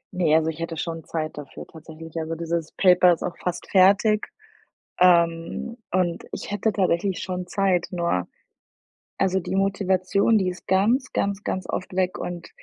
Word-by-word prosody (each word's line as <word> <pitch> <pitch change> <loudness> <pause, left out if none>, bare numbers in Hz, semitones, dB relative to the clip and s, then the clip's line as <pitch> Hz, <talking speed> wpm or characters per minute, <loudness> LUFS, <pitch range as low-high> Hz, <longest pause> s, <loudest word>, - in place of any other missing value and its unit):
Ne, 165 -4 +3
also, 160 0 +2
ich 160 0 -6
hätte 165 0 -4
schon 165 0 -4
Zeit 155 -1 -4
dafür 145 - -9
tatsächlich. 160 0 -12
Also 160 +1 -3
dieses 165 -1 -3
Paper 180 -1 +5
ist 165 - -5
auch 175 - -3
fast 180 -1 -4
fertig, 200 +3 +4 0.7
ähm, 170 +5 +2
und 180 -2 0
ich - - -6
hätte 205 +2 0
tatsächlich 185 -1 0
schon 180 -1 -4
Zeit, 190 -1 +1
nur 170 - -1 0.9
also, 190 0 +2
die 180 - -4
Motivation, 195 +2 +2
die 185 -2 0
ist 180 0 -9
ganz, 215 +8 +2
ganz, 200 0 -1
ganz 185 -1 -3
oft 185 - -4
weg 185 -1 0
und 175 -1 -6
180 Hz, 160 wpm, -24 LUFS, 165-190 Hz, 0.9 s, Paper